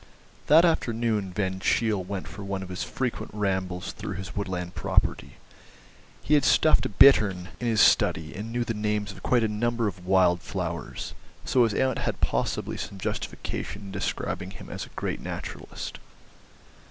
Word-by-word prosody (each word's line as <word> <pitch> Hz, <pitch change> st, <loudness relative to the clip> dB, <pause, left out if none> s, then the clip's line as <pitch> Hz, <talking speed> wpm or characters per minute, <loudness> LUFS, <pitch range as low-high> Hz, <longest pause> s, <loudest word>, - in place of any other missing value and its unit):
That 160 Hz, +4 st, +7 dB
afternoon 115 Hz, -, 0 dB
Van 95 Hz, -1 st, -2 dB
Cheele 105 Hz, 0 st, +1 dB
went 95 Hz, 0 st, -5 dB
for 100 Hz, -, -8 dB
one 100 Hz, -1 st, -3 dB
of 95 Hz, -, -9 dB
his 90 Hz, -, -4 dB
frequent 120 Hz, -4 st, -3 dB
rambles 95 Hz, -3 st, -1 dB
through -, -, -6 dB
his 95 Hz, 0 st, -7 dB
woodland 90 Hz, -3 st, -3 dB
property. -, -, 0 dB, 0.9 s
He 150 Hz, -, +1 dB
had 150 Hz, -, +6 dB
a -, -, -2 dB
stuffed 155 Hz, -9 st, +4 dB
bittern 100 Hz, -9 st, +6 dB
in 120 Hz, -, -2 dB
his 110 Hz, -2 st, +3 dB
study, 80 Hz, -1 st, +4 dB
and 110 Hz, +3 st, -6 dB
knew 120 Hz, +1 st, 0 dB
the 115 Hz, -, -2 dB
names 105 Hz, -1 st, -1 dB
of 95 Hz, 0 st, -12 dB
quite 120 Hz, -2 st, +2 dB
a -, -, +3 dB
number 115 Hz, +2 st, 0 dB
of 90 Hz, -3 st, -6 dB
wild 90 Hz, -2 st, +4 dB
flowers, 85 Hz, -2 st, -4 dB, 0.3 s
so 125 Hz, -2 st, +4 dB
his 110 Hz, -3 st, -1 dB
aunt 130 Hz, 0 st, +1 dB
had -, -, -2 dB
possibly -, -, -1 dB
some 100 Hz, -, -6 dB
justification 100 Hz, +1 st, -4 dB
in 100 Hz, -, -8 dB
describing 95 Hz, -, -3 dB
him -, -, -10 dB
as -, -, -5 dB
a -, -, -22 dB
great -, -, -2 dB
naturalist. -, -, -6 dB
100 Hz, 170 wpm, -27 LUFS, 95-115 Hz, 0.9 s, That